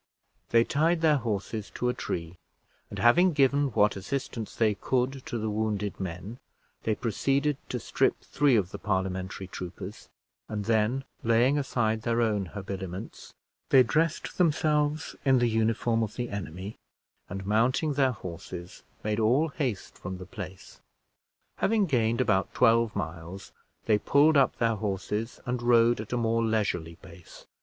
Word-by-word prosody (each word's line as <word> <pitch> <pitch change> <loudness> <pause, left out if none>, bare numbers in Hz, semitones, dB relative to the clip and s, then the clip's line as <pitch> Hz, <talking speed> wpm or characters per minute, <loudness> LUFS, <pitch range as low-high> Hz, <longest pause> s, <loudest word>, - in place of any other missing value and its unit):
They 115 0 +5
tied 160 +6 +1
their 155 -2 +4
horses 110 -3 -3
to 125 - -1
a 125 - +2
tree, 85 -4 -5 0.5
and - - -7
having 175 +10 +5
given 140 0 +3
what 105 -1 +3
assistance 115 +2 -4
they 110 -2 +3
could 130 +5 -1
to 120 - -3
the 110 -1 -2
wounded 105 -1 -2
men, 95 +6 -6 0.5
they 110 - +1
proceeded 135 +6 0
to - - -2
strip - - +1
three 145 -4 +2
of 95 -4 +1
the - - -7
Parliamentary 95 -1 -2
troopers; 95 +2 -8 0.4
and 105 -2 -3
then 115 +4 +1 0.2
laying 115 +4 +4
aside 110 -5 0
their 115 +1 0
own 105 -5 +1
habiliments, 95 0 -7 0.3
they 130 -1 +7
dressed 160 +8 -1
themselves 150 -2 +1
in 135 -2 +4
the 120 - +3
uniform 115 +1 +1
of 110 -2 -3
the 120 -1 -3
enemy, 95 +1 -6 0.5
and, 95 -1 -5
mounting 120 +9 +2
their 135 -2 +3
horses, 85 -3 -8 0.2
made 105 +1 -1
all 130 +9 +3
haste 130 -9 -4
from 95 0 -5
the 90 - -9
place. 95 0 -9 0.8
Having 215 -1 +2
gained 115 -7 +1
about 95 -7 +1
twelve 115 -2 +4
miles, 85 +1 -6 0.3
they 105 -1 +3
pulled 145 +7 +4
up 135 -2 +4
their 115 -2 +1
horses, 105 +3 -3
and 125 0 -2
rode 120 -1 +4
at 110 - -9
a 125 - 0
more 115 0 +1
leisurely 100 -7 -1
pace. 85 -1 -14
115 Hz, 150 wpm, -28 LUFS, 100-130 Hz, 0.8 s, they